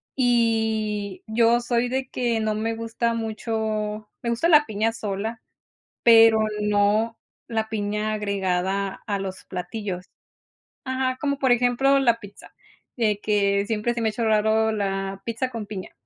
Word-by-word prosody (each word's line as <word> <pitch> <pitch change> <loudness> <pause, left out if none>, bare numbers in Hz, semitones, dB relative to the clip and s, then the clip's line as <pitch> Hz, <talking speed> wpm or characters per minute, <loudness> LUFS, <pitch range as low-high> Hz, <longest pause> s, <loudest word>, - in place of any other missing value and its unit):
y 220 -5 +1
yo 230 +2 +3
soy 240 0 0
de 265 +1 -2
que 235 -3 0
no 215 -1 0
me 225 +1 -2
gusta 230 +1 -1
mucho 220 -1 -3
me 235 - -1
gusta 285 +9 +1
la 300 -2 +6
piña 220 +1 0
sola, 215 +2 -4 0.6
pero 225 -1 +7 0.2
no 210 +2 +2 0.3
la 220 -1 -2
piña 210 0 -2
agregada 195 -1 -1
a 200 -1 -1
los 190 -1 -6
platillos. 185 -1 -5 0.8
Ajá, 260 -1 -1
como 280 -1 0
por 260 -2 +2
ejemplo 245 +3 +3
la 235 -3 +3
pizza, 205 0 -13 0.4
de 210 -3 +1
que 200 -1 +1
siempre 225 +1 0
se 235 - -3
me 220 - +2
ha - - -3
hecho 230 +1 -2
raro 220 +1 +3
la 195 -1 -2
pizza 235 +3 -2
con 225 -3 -5
piña, 190 -3 -7
220 Hz, 150 wpm, -24 LUFS, 205-235 Hz, 0.8 s, pero